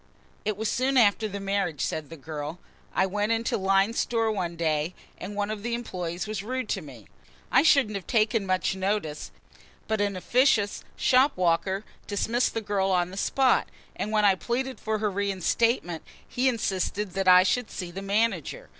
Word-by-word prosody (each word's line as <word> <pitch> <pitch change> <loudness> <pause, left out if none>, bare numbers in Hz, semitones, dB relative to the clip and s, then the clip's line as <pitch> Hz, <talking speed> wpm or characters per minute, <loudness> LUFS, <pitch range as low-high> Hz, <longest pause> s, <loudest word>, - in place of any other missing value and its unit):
"It 215 -1 -1
was 220 +1 -1
soon 260 +4 +1
after 215 -2 +4
the 200 -1 -5
marriage," 195 -6 -1
said 155 -2 -4
the 165 - -9
girl. 150 +2 -6 0.3
"I 190 - +2
went 205 +3 -1
into 230 0 0
Lyne's 195 +3 +2
Store 225 -2 +1
one 180 -5 -3
day 160 0 -1 0.2
and 200 +3 -6
one 205 +1 -1
of 215 -1 -5
the 235 +2 -2
employees 180 -6 -4
was 215 -2 -4
rude 255 +2 -3
to 195 - -1
me. 130 - -12 0.5
I 260 - +6
shouldn't 275 -8 +4
have 195 -4 -5
taken 220 -2 +1
much 185 0 +1
notice, 190 -6 -2 0.6
but 220 -1 0
an 200 -1 0
officious 215 +1 +2
shop 265 0 +3
walker 185 +3 +1 0.2
dismissed 230 +5 0
the 225 - -1
girl 200 -2 0
on 180 -1 +1
the - - -8
spot, 260 +6 +2 0.3
and 210 - -3
when 215 -1 +3
I 200 - +6
pleaded 250 +7 -3
for 220 0 -1
her 210 -1 -1
reinstatement, 195 -1 0 0.3
he 260 +2 +1
insisted 205 -3 -2
that 195 +1 -2
I 180 0 +8
should 245 +6 0
see 180 -2 -6
the 195 +3 -6
manager. 200 -4 -1
200 Hz, 180 wpm, -27 LUFS, 185-225 Hz, 0.6 s, I